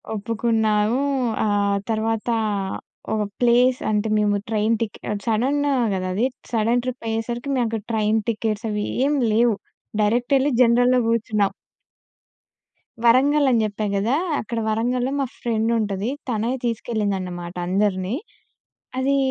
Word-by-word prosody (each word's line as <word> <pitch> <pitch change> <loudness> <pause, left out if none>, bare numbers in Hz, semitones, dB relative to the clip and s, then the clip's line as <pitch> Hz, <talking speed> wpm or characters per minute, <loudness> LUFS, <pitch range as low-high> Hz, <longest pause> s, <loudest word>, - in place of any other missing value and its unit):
ఒప్పుకున్నాము. 220 +1 +1 0.4
ఆహ్, 200 -1 +2
తర్వాత 225 +1 -1 0.8
ఒక 215 - 0 0.2
ప్లేస్ 245 +1 +4
అంటే, 210 0 +1
మేము 210 -1 +2
ట్రైన్ 220 +1 +2
టికె 220 -3 -3 0.3
సడెన్ 245 +6 +1 0.3
కదా! 185 -1 -2
అది 215 +6 +1 0.3
సడెన్ 230 +2 +2
ట్రిప్ 255 -2 -5
అయ్యేసరికి 235 +4 -3
మాకు 245 - +2
అక్కడ 225 -1 -3
ట్రైన్ 220 0 +2
టికెట్స్ 220 0 -2
అవి 210 0 -1 0.2
ఏం 295 +1 +2 0.2
లేవు 230 +1 +3 0.5
డైరెక్ట్ 240 +6 +2
ఎళ్లి 275 +2 +1
జనరల్‌లో 245 +1 +4
కూర్చున్నాం. 215 -3 +1 1.5
వరంగల్ 275 +5 +4
అని 235 -2 +3
చెప్పా 210 0 -3
కదా! 220 +7 +1 0.2
అక్కడ 230 +1 -3
వరంగల్‌లో 245 +4 0
మా 275 - +1
ఫ్రెండ్ 225 -1 0
ఉంటది. 205 0 -2 0.2
తనే 225 0 0
తీసుకెళ్ళిందన్నమాట 195 -7 -2
అందరిని. 190 +2 0 0.8
అది 275 +2 +2
225 Hz, 120 wpm, -22 LUFS, 210-240 Hz, 1.5 s, ప్లేస్